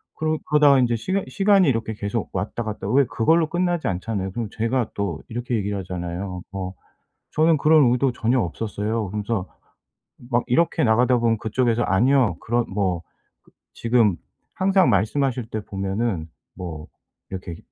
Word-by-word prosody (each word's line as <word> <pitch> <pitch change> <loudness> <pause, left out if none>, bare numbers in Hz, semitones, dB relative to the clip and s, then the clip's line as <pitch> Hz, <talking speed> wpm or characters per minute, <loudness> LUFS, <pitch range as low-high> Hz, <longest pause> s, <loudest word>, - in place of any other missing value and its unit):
그러 155 0 -1
그러다가 145 -2 +5
인제 120 -2 +2
시간 190 - -1
시간이 195 -4 +4
이렇게 115 -3 -1
계속 105 +2 -3
왔다 100 +5 -3
갔다 105 -2 -5
왜 135 +3 +4
그걸로 160 +10 +2
끝나지 175 -1 0
않잖아요. 95 +1 -2
그러고 115 0 -4
제가 115 +1 -1
또 100 -6 -3
이렇게 120 +1 -3
얘기를 100 0 -2
하잖아요. 90 0 -5
"어 95 -1 -4 0.6
저는 160 +1 +3
그런 150 -3 +5
의도 125 0 +2
전혀 120 +2 +1
없었어요." 105 +4 -2
그러면서 105 -1 -3 0.8
막 120 - +3
이렇게 165 +5 +2
나가다 120 +2 +3
보면 115 -1 +2
그쪽에서 120 +1 0
"아니요." 115 -1 +3
그런 120 +1 0
뭐 95 -4 -1 0.7
지금 115 -5 +2 0.4
항상 190 -1 +3
말씀하실 120 +4 +1
때 110 - -3
보면은 95 -3 -2 0.3
뭐 80 -5 -7 0.4
이렇게 90 -3 -6
115 Hz, 340 characters per minute, -23 LUFS, 100-130 Hz, 0.8 s, 그러다가